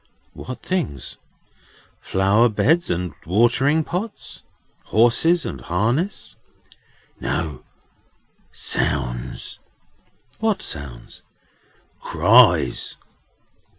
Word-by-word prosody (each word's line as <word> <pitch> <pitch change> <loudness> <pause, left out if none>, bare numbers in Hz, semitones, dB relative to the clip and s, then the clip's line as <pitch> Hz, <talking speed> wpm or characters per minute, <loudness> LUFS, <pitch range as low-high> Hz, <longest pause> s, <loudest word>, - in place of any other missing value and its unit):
"What 130 - -8
things? 70 - -3 0.8
Flower 100 +5 +2
beds 160 +10 +2
and 90 -2 -2
watering 120 - +3
pots? 195 +8 -6 0.4
horses 130 +10 +3
and 65 - -5
harness?" 120 - -2 0.8
"No. 75 -6 -3 0.9
Sounds." 60 -3 -2 0.8
"What 220 -3 0
sounds?" 70 -5 -7 0.8
"Cries." - - +3
110 Hz, 65 wpm, -21 LUFS, -, 0.9 s, watering